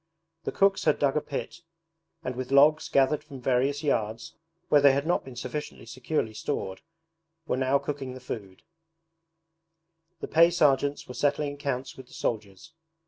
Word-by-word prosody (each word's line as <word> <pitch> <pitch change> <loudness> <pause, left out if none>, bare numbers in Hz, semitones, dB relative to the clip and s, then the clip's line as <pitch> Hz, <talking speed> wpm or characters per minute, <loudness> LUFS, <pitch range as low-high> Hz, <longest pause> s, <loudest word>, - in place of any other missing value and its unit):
The - - -1
cooks 195 0 +2
had 155 - +3
dug 140 -2 +1
a 150 - +2
pit, 155 +4 -6 0.6
and 130 -3 -3
with 130 +1 -5
logs 150 +3 +5
gathered 140 +2 +2
from 140 -3 -10
various 135 +4 +1
yards 115 -5 -1 0.3
(where 145 - +5
they 140 -1 +7
had 140 +2 0
not 175 - +1
been 130 -2 -11
sufficiently 130 +4 -6
securely 125 -1 -2
stored) 95 -5 -4 0.6
were - - 0
now 130 +1 +2
cooking 140 -2 -5
the - - -8
food; 100 -7 -8 1.6
the - - -5
pay 165 +1 +6
sergeants 145 -4 +2
were 125 - -7
settling 145 +3 0
accounts 140 -2 -4
with 130 -1 -11
the - - -18
soldiers. 105 +4 -4
135 Hz, 160 wpm, -27 LUFS, 125-145 Hz, 1.6 s, they